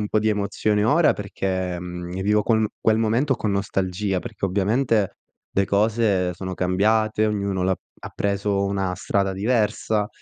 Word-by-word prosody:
un 105 - -2
po' 110 - +2
di 110 - +1
emozione 105 0 0
ora, - - +4
perché, 95 -2 -3
ehm, 90 0 -6
vivo 105 +2 +2
quel 110 0 +2
quel 110 0 +3
momento 120 +5 +1
con 105 - -1
nostalgia, 95 0 -1
perché - - -6
ovviamente 105 +3 +1 0.3
le 100 - +1
cose 100 -3 +1
sono 95 +1 -5
cambiate, 110 +4 +2
ognuno 100 -3 -1
l'ha 95 0 +1 0.2
ha - - -8
preso 100 0 0
una 95 -2 -1
strada 100 +1 0
diversa. 105 0 0
100 Hz, 155 wpm, -23 LUFS, 95-110 Hz, 0.3 s, ora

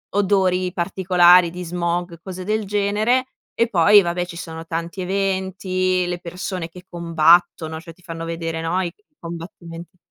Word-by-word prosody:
odori 185 -2 +2
particolari 180 -1 +4
di 180 +1 -6
smog, 175 0 -3
cose 185 -1 -7
del 215 +2 -1
genere. 210 +5 +1 0.3
E 230 - +1
poi 205 0 +6
vabbè, 175 0 -2
ci 175 -1 -10
sono 165 -1 -7
tanti 170 +3 -4
eventi, 185 -1 -1
le 175 0 -2
persone 180 0 -5
che 180 +2 -13
combattono, 165 -1 +2
cioè 165 0 -12
ti 180 - -26
fanno 165 -2 -7
vedere, 165 -1 -4
no, 170 +3 0
i 175 -2 -3 0.3
combattimenti 170 0 -9
180 Hz, 150 wpm, -21 LUFS, 170-190 Hz, 0.3 s, poi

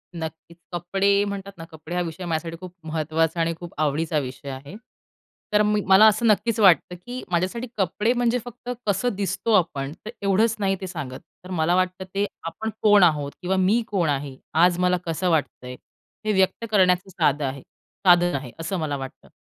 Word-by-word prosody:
नक्कीच. 160 +1 -7 0.2
कपडे 195 +3 +2
म्हणतात 200 -1 -5
ना, 165 - -8
कपडे 160 +2 -8
हा 180 - +1
विषय 175 +1 -5
माझ्यासाठी 165 0 -3
खूप 180 -1 -9
महत्त्वाचा 160 +1 0
आणि 165 0 +1
खूप 175 -2 -9
आवडीचा 155 +1 0
विषय 135 +1 -7
आहे. 135 +6 -8 0.8
तर 210 - +5
मी 210 0 +2
मला 190 +3 +8
असं 220 +2 +2
नक्कीच 215 +1 +2
वाटतं 180 -3 +5
की 245 +8 -8
माझ्यासाठी 185 +8 -1
कपडे 210 +3 +1
म्हणजे 245 0 +1
फक्त 245 0 -9 0.2
कसं 205 +5 +1
दिसतो 205 +3 -1
आपण 140 -8 +1
तर - - -5
एवढंच 205 +3 +2
नाही 195 -1 +1
ते 190 - -4
सांगत, 145 -8 -6 0.2
तर 180 - -11
मला 170 0 +1
वाटतं 185 0 0
ते 200 +1 +2 0.2
आपण 220 +7 -4
कोण 210 -2 +6
आहोत? 150 -4 +2
किंवा 185 +1 0
मी 195 +6 +3
कोण 180 -6 0
आहे? 140 -1 -2 0.2
आज 175 +2 +4
मला 180 0 +3
कसं 170 +2 -1
वाटतंय, 140 -5 -1 0.5
हे 215 - +1
व्यक्त 190 +4 +1
करण्याचं 185 -2 +3
साधं 145 -5 +1
आहे 135 0 -4 0.5
साधन 175 -1 +5
आहे 130 -3 -5
असं 165 +4 -3
मला 150 -3 -2
वाटतं. 135 -1 -9
180 Hz, 180 wpm, -24 LUFS, 160-200 Hz, 0.8 s, मला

